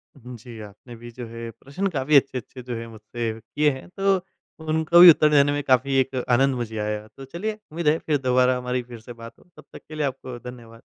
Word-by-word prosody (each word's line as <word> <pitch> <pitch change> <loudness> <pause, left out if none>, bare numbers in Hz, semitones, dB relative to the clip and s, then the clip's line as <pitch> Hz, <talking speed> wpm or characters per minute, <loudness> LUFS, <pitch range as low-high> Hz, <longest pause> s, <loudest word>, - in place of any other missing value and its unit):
उम, 125 -2 -11
जी, 115 0 -12
आपने 105 +4 -12
भी 120 +1 -11
जो 120 +1 -8
है 115 0 -8
प्रश्न 140 - -4
काफ़ी 135 +3 +1
अच्छे-अच्छे 130 -2 +1
जो 120 -1 -5
है 115 - -7
मुझसे 115 +1 -5
किए 145 +7 0
हैं 130 - -9
तो 195 0 +3 0.5
उनको 160 +2 +3
भी 175 0 +12
उत्तर 155 -1 +6
देने 145 -1 +4
में 145 0 -1
काफ़ी 135 +1 +2
एक 135 0 -1 0.2
आनंद 135 +2 +3
मुझे 115 -3 -5
आया। 105 0 -3
तो 135 - -9
चलिए 175 +10 -4 0.2
उम्मीद 165 -1 -3
है 155 +2 +4
फिर 150 -2 0
दोबारा 125 0 +3
हमारी 125 0 -3
फिर 120 - -8
से 120 +2 -11
बात 115 0 -11
हो, - - -21
तब - - -13
तक - - -11
के 155 - -10
लिए 150 - -1
आपको 130 -2 -5
धन्यवाद। 115 -2 -13
125 Hz, 230 wpm, -23 LUFS, 115-145 Hz, 0.5 s, भी